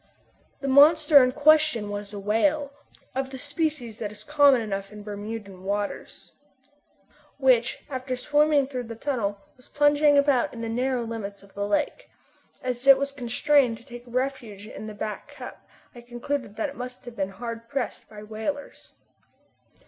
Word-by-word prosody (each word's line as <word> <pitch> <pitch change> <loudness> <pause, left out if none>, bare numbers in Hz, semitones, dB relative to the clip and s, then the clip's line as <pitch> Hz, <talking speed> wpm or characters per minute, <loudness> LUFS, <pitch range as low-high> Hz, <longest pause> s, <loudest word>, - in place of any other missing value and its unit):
The 275 - -3
monster 295 +1 +7
in 255 - +2
question 295 -7 +3
was 205 0 -5
a 205 - -7
whale, 280 +8 +1 0.4
of 265 0 -2
the 265 - -7
species 285 -5 -3
that 210 -2 -4
is 210 0 -11
common 285 -1 +5
enough 195 -3 -4
in 210 0 -10
Bermudan 205 -2 -7
waters, 205 +1 -4 1.1
which 260 -2 +2
after 255 -1 -4
swimming 295 +2 +3
through 255 -2 -5
the 230 0 -7
tunnel 225 -5 -2 0.2
was 255 - -17
plunging 290 0 +4
about 280 -4 +2
in 230 - -7
the 230 - -3
narrow 250 +1 0
limits 210 -4 -6
of 200 - -19
the 200 0 -3
lake. 205 - -1 0.5
As 250 +1 -3
it 275 -1 +10
was 280 +1 -2
constrained 260 -1 +2
to 235 - -18
take 240 -2 -9
refuge 240 -5 -3
in 215 0 -8
Back 215 0 -5
Cup - - -11 0.3
I 240 - -11
concluded 240 -1 -4
that 300 - -2
it 280 - -11
must 250 -1 -8
have 240 -1 -9
been 195 -2 -2
hard 230 +3 -7
pressed 270 -1 -4
by 210 -1 -10
whalers. 220 +7 -6
245 Hz, 165 wpm, -26 LUFS, 215-280 Hz, 1.1 s, it